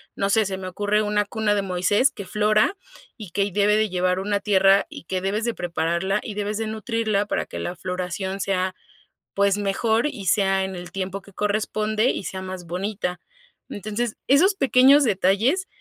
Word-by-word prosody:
no 195 - 0
sé, 220 -2 +3
se 190 0 -3
me 185 -1 -6
ocurre 205 +3 0
una 210 0 +1
cuna 215 0 0
de 200 - +1
Moisés 195 +8 +2
que 200 - -8
flora 215 - +2 0.4
y 215 -6 -9
que 200 +2 +1
y 200 - -3
debe 205 +2 +3
de 215 -1 +1
llevar 180 0 0
una 200 +1 0
tierra 195 -1 +4
y - - -10
que 185 0 -2
debes 210 +4 -1
de 235 - 0
prepararla 170 +3 -1
y 210 - -6
debes 210 0 -2
de 225 - -1
nutrirla 220 -1 -1
para - - -1
que - - -7
la 175 - -4
floración 185 +2 -4
sea, 185 -1 -1 0.6
pues, 200 0 +2
mejor 220 +5 +1
y 210 -9 -6
sea 195 0 +2
en 190 0 -4
el 175 -1 -8
tiempo 195 +1 -4
que 200 0 -18
corresponde 215 +3 0
y - - -2
sea 190 - -5
más 185 -2 -7
bonita. 180 0 -3 0.5
Entonces, 215 +3 -3
esos 335 +10 +5
pequeños 275 -3 +5
detalles 225 - +2
200 Hz, 190 wpm, -23 LUFS, 190-215 Hz, 0.6 s, esos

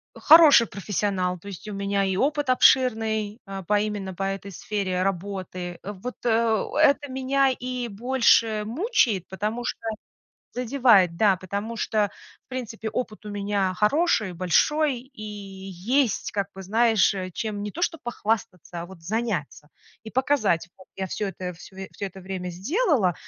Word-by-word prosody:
Хороший 305 -6 +8
профессионал, 195 -2 -2
то 200 +4 -12
есть 200 +2 -8
у - - -5
меня 200 0 0
и 190 -1 0
опыт 290 +4 0
обширный, 220 -4 +3
а, 195 -1 -6
по 205 +4 +2
именно 205 -3 -3
по 190 - -5
этой 195 0 -4
сфере 190 -1 -2
работы. 185 -2 -4
Вот, 205 +5 -6
э 225 -2 +2 0.2
это 285 -1 +4
меня 270 +1 +2
и 250 -1 -3
больше 230 -1 +3
мучает, 240 - +1
потому 215 +5 -3
что - - -3 0.8
Задевает, 240 -8 +4
да, 205 -2 +4
потому 200 +5 -5
что, 210 -2 0 0.4
в - - -58
принципе, 230 -3 -5
опыт 215 -3 -4
у - - -5
меня 200 -2 -1
хороший, 215 - +2
большой, 260 - +2
и 260 -3 -15
есть 200 +4 -2
как 200 -1 -1
бы, 195 - -8
знаешь, 220 +1 +3
э, 185 -2 -4
чем 210 +1 -4
не 210 - -3
то 340 - -3
что 330 -3 -1
похвастаться, 205 -7 -3
а - - -6
вот 185 -3 -14
заняться 185 -7 -3 0.4
и 220 - -8
показать: 245 - +1
вот 185 - -16
я 190 - -3
всё 205 +3 -3
это 185 -1 -5
всё 180 +3 -14 0.2
всё 200 - -5
это 190 0 -12
время 185 -1 -5
сделала, 235 - +1
210 Hz, 155 wpm, -25 LUFS, 190-245 Hz, 0.8 s, Хороший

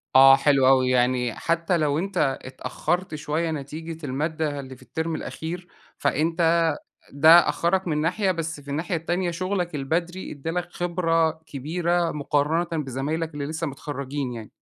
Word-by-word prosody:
آه 135 0 +9
حلو 140 -2 +3
أوي، 130 -1 +5
يعني 125 -1 +2
حتّى 170 +1 0
لو 150 -1 +1
أنت 175 -8 0
اتأخّرت 165 +6 -3
شوية 155 +2 -1
نتيجة 155 +2 -6
المادّة 150 +2 -2
اللي 130 -1 -8
في - - -20
التيرم 160 0 -3
الأخير، 175 +4 -6 0.3
فأنت 165 +4 +2 0.5
ده 160 +5 +7
أخّرك 185 +1 +1
من 150 -1 0
ناحية 185 +5 +1
بس 165 -3 -3
في 145 - -17
الناحية 165 +4 -1
التانية 175 +2 -1
شُغلك 180 -1 -2
البدري 170 +6 -2
ادَّى 150 +2 -5
لَك 175 +1 -3
خبرة 165 -2 +1 0.2
كبيرة 170 +4 -1
مقارنةً 150 +3 0 0.2
بزمايلك 150 +5 -3
اللي 145 -1 -3
لسّه 160 +2 -3
متخرجين 140 -2 -4
يعني. 115 -3 -8
160 Hz, 145 wpm, -24 LUFS, 140-170 Hz, 0.5 s, آه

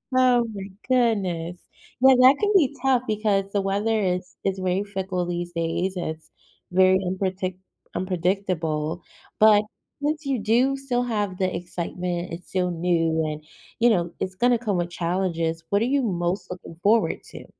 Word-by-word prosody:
Oh 250 -2 +4
my 195 0 -7 0.2
goodness. 195 -9 +1 0.4
Yeah, 265 0 +8
that 255 +2 +7
can 415 0 +2
be 290 -7 +4
tough, 260 -2 +2
because 210 -2 +1
the 200 - +1
weather 205 +3 0
is 180 -2 -2
is 195 -1 -1
very 185 +1 0
fickle 190 -3 -3
these 175 0 -3
days, 170 +3 -1
and 180 - -3
it's 160 0 -7 0.4
very 185 +1 +5
unpretic 185 0 -2 0.4
unpredictable, 175 -3 -1 0.4
but 215 -1 +6 0.4
since 305 +1 -1
you 270 -3 0
do 240 +6 +2
still 255 -3 -1
have 205 -6 -2
the 185 -1 0
excitement, 175 0 -4
it's 170 +2 -9
still 180 -1 0
new, 165 -2 +1
and 155 0 -4 0.4
you 240 +1 +5
know, 175 -6 +1
it's 185 0 -3
gonna 240 +4 +3
come 210 -6 -1
with 175 0 -1
challenges, 170 -2 -1
what 200 +1 +2
are - - +2
you 275 +3 +2
most 180 -4 -2
looking 180 -2 -9
forward 220 +3 +3
to? - - -11
190 Hz, 165 wpm, -24 LUFS, 175-225 Hz, 0.4 s, Yeah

